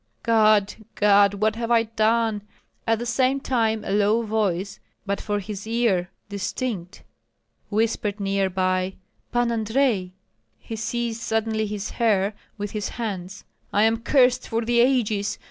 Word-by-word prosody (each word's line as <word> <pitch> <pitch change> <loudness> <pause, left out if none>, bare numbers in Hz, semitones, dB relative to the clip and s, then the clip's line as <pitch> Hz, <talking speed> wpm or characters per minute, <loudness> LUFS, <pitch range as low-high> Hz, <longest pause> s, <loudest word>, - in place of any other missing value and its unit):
God! 215 -3 +4 0.2
God! 205 -1 +5
what 215 +2 +1
have 230 0 -3
I 230 -1 +4
done?" 225 -1 +1 0.5
At 225 0 +3
the 240 - -4
same 255 +3 +1
time 225 -5 0
a - - -3
low 210 +3 +3
voice, 200 -3 -1 0.3
but 200 0 -2
for 205 -1 -1
his 205 +1 -7
ear 225 -6 +1 0.2
distinct, 200 -2 -4 0.7
whispered 215 -1 0
near 195 -1 0
by, 185 0 0 0.4
"Pan 240 -1 +1
Andrei!" 225 -3 +1 0.5
He 225 - -7
seized 230 +1 -3
suddenly 220 -1 -1
his 205 -1 -4
hair 210 -3 +1 0.2
with 205 -1 -4
his 210 -2 -3
hands. 200 -4 -5 0.3
"I 205 - +3
am 225 +1 +3
cursed 250 +1 +3
for 225 0 -1
the 235 +1 +2
ages! 225 -5 +2
215 Hz, 145 wpm, -24 LUFS, 200-230 Hz, 0.7 s, God